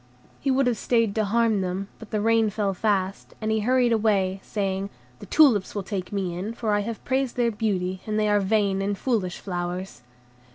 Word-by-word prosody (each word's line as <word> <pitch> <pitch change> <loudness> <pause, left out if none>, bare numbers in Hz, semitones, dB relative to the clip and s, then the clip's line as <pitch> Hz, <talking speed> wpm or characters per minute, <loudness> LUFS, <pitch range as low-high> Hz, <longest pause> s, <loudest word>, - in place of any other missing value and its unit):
He 275 - -1
would 270 0 +3
have 240 -4 0
stayed 230 -4 +2
to 220 0 +1
harm 225 -1 +2
them, 185 +1 -3
but 225 - -11
the 215 - -1
rain 225 0 +3
fell 200 -1 -1
fast, 195 -1 -1
and 220 0 -1
he 220 - +2
hurried 245 +2 +2
away, 200 -4 +1
saying, 195 -1 -2 0.3
"The - - -10
tulips 240 -13 +4
will 200 - -2
take 190 -2 -4
me 190 -4 -2
in, 205 +6 -4
for 220 -3 -1
I 205 - +3
have 215 +1 -5
praised 265 -1 0
their 240 -1 +2
beauty, 190 -4 -1
and 215 0 -1
they 215 - +2
are 205 0 +3
vain 200 -1 +1
and 200 0 -1
foolish 205 -9 -1
flowers." 180 -1 -5
205 Hz, 205 wpm, -25 LUFS, 195-225 Hz, 0.3 s, tulips